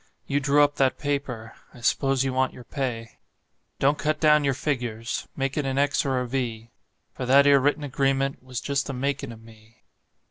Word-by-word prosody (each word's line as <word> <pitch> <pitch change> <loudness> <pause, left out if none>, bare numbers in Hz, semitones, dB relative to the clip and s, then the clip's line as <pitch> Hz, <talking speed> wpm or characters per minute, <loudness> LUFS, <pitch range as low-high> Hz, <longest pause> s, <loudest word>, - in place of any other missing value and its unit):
You 140 - 0
drew 145 +1 +4
up 145 0 +1
that 135 -1 +2
paper 140 -6 -3 0.2
I 120 - -13
s'pose 135 +2 +2
you 135 -1 -1
want 130 0 +1
your 125 - -11
pay. 120 -3 -4 0.6
Don't 145 +2 +2
cut 155 +1 0
down 150 -1 +5
your 135 -2 +1
figures; 120 -5 -3
make 135 +1 -2
it 150 - 0
an 135 0 -2
X 145 +1 +2
or 130 -1 +1
a 125 - -3
V; 115 -3 -3 0.4
For 125 - -5
that 140 +2 +6
'ere 140 -1 +6
written 145 +3 +1
agreement 135 0 0
was 130 -2 -6
just 140 +2 -1
the 140 - -4
makin' 135 0 -2
of 115 -1 -12
me. 110 0 -19
135 Hz, 200 wpm, -25 LUFS, 125-140 Hz, 0.6 s, that